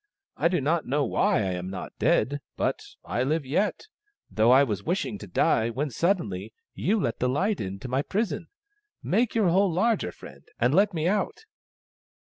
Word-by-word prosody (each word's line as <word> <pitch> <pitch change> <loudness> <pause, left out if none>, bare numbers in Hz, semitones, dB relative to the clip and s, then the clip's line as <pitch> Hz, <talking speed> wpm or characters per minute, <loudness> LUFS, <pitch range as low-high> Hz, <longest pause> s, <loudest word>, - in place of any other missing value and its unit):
I - - +2
do 175 0 +1
not 155 +4 0
know 140 +2 +1
why - - +2
I 95 - -1
am 90 0 -4
not 95 -1 -6
dead 140 +6 +2
— - - -53
but - - 0 0.2
I 120 - -1
live 150 +3 0
yet, 180 +10 0 0.5
though 110 +2 +3
I 130 +3 +7
was 105 -7 -2
wishing 165 - -2
to 105 - -9
die 110 +5 +2
when 140 +5 -2
suddenly 110 - -1 0.2
you 215 +4 0
let 115 - -2
the 125 - +1
light 190 +10 0
in 95 -1 -4
to - - -6
my 130 +2 0
prison. 195 -1 -2 0.6
Make 225 +5 +1
your 215 -5 +3
hole 190 +2 +3
larger, 190 - +1
friend, 70 -4 -13 0.2
and 120 +3 +2
let 200 +2 +3
me 160 +1 0
out." 205 - -1
145 Hz, 190 wpm, -26 LUFS, 115-190 Hz, 0.6 s, I